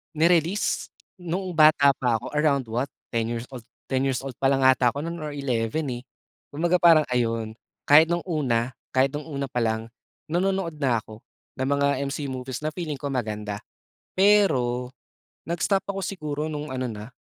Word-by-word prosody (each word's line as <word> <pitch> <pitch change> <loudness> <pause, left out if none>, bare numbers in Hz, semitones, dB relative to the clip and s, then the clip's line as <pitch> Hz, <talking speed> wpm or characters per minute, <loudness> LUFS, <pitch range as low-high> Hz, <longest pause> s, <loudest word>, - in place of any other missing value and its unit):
Ni-release 170 +4 +1 0.2
noong 180 +2 -3
bata 155 -2 +7
pa 125 -3 +1
ako 110 - -3
around 140 -6 +1
what 125 +4 0 0.2
10 115 -1 0
years 115 0 -3
old, 125 -4 -10 0.2
10 135 0 +1
years 130 -1 -1
old 135 -3 -7
pa 135 - +1
lang 135 0 +3
'ata 130 -2 +4
ako 145 - -3
noon 170 +1 -4
or 150 -2 -5
11 135 +1 -1
eh, 120 0 -5 0.5
kumbaga 175 +4 +2
parang 165 -3 +7
ayun, 115 -2 0 0.3
kahit 155 +3 +7
nung 175 0 -1
una, 130 -8 0 0.2
kahit 130 +1 +4
nung 150 +1 -6
una 140 -3 -4
palang, 115 -2 -1 0.4
nanonood 180 -2 0
na 120 -6 +1
ako 110 -1 -12 0.4
ng 130 - 0
mga 140 +1 +2 0.2
MC 140 0 -4
movies 130 +1 -5
na 155 - -1
feeling 160 -2 -4
ko 140 0 -5
maganda. 105 -5 -3 0.6
Pero 135 -11 +3 0.5
nag-stop 175 +4 0
ako 195 - -4
siguro 155 -6 -4
nung 150 -2 -5
ano 130 -1 -2
na, 110 0 -7
140 Hz, 170 wpm, -25 LUFS, 125-160 Hz, 0.6 s, bata